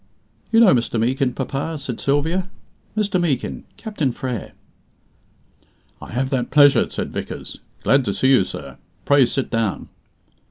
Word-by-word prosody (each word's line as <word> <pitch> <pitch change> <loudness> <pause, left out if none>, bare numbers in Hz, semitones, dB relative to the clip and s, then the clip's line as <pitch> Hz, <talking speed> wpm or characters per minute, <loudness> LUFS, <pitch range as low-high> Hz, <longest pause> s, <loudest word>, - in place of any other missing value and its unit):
"You 225 - +5
know 205 -6 +7
Mr. 120 -1 0
Meekin, 130 +2 +1
papa?" 140 +4 -3
said 135 -5 -6
Sylvia. 160 +7 0 0.5
"Mr. 205 -4 +1
Meekin, 145 -8 -2
Captain 185 - -2
Frere." 125 -2 -5 1.5
"I - - -9
have 130 +3 -1
that 125 -3 -1
pleasure," 145 -1 +5
said - - -5
Vickers. - - -6 0.2
"Glad 135 0 +4
to 100 - -1
see 130 - +2
you, 130 -7 +5
sir. - - -8 0.3
Pray 140 -3 +5
sit 135 +2 -2
down." 115 -4 -1
135 Hz, 145 wpm, -21 LUFS, 125-160 Hz, 1.5 s, know